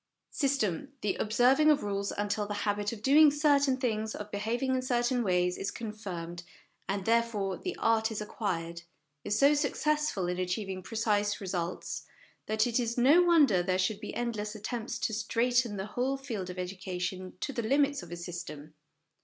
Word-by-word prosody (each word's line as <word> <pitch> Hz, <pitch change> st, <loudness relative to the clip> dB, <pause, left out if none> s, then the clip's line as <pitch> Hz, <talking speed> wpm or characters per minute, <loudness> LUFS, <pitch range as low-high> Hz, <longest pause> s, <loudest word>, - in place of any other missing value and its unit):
System 275 Hz, -, -1 dB
the 205 Hz, -, 0 dB
observing 250 Hz, +7 st, +4 dB
of 295 Hz, -1 st, +4 dB
rules 200 Hz, -1 st, -2 dB
until 205 Hz, 0 st, -1 dB
the 205 Hz, -, -3 dB
habit 205 Hz, 0 st, 0 dB
of 220 Hz, -2 st, -8 dB
doing 295 Hz, +4 st, +7 dB
certain 285 Hz, -2 st, +3 dB
things, 220 Hz, -4 st, -1 dB
of 210 Hz, 0 st, -7 dB
behaving 235 Hz, +6 st, -1 dB
in 260 Hz, -, +1 dB
certain 245 Hz, -1 st, +1 dB
ways, 180 Hz, -2 st, +1 dB
is 195 Hz, -, -2 dB
confirmed, 185 Hz, -7 st, -6 dB, 0.5 s
and, 195 Hz, -1 st, -1 dB
therefore, 225 Hz, -4 st, +1 dB
the 365 Hz, -, -5 dB
art 225 Hz, 0 st, +2 dB
is 220 Hz, -, -4 dB
acquired 170 Hz, -6 st, -3 dB, 0.4 s
is 205 Hz, -, 0 dB
so 280 Hz, +1 st, +6 dB
successful 300 Hz, -, 0 dB
in 180 Hz, +1 st, -2 dB
achieving 185 Hz, +1 st, -2 dB
precise 210 Hz, -1 st, 0 dB
results, 180 Hz, -3 st, -4 dB, 0.4 s
that 215 Hz, 0 st, +2 dB
it 240 Hz, 0 st, +1 dB
is 235 Hz, -1 st, -2 dB
no 280 Hz, +8 st, +6 dB
wonder 300 Hz, -, +5 dB
there 185 Hz, +1 st, 0 dB
should 195 Hz, +3 st, 0 dB
be -, -, -7 dB
endless 220 Hz, -3 st, -3 dB
attempts 220 Hz, +2 st, -4 dB
to 220 Hz, -, -2 dB
straiten 230 Hz, +1 st, +1 dB
the 190 Hz, -, -3 dB
whole 250 Hz, +6 st, -1 dB
field 225 Hz, -9 st, -5 dB
of 180 Hz, -, -7 dB
education 185 Hz, 0 st, -4 dB
to 280 Hz, -, -3 dB
the 235 Hz, -, -1 dB
limits 280 Hz, +4 st, +2 dB
of 175 Hz, -1 st, -11 dB
a -, -, -4 dB
system. 165 Hz, -4 st, -7 dB
215 Hz, 170 wpm, -30 LUFS, 190-250 Hz, 0.5 s, doing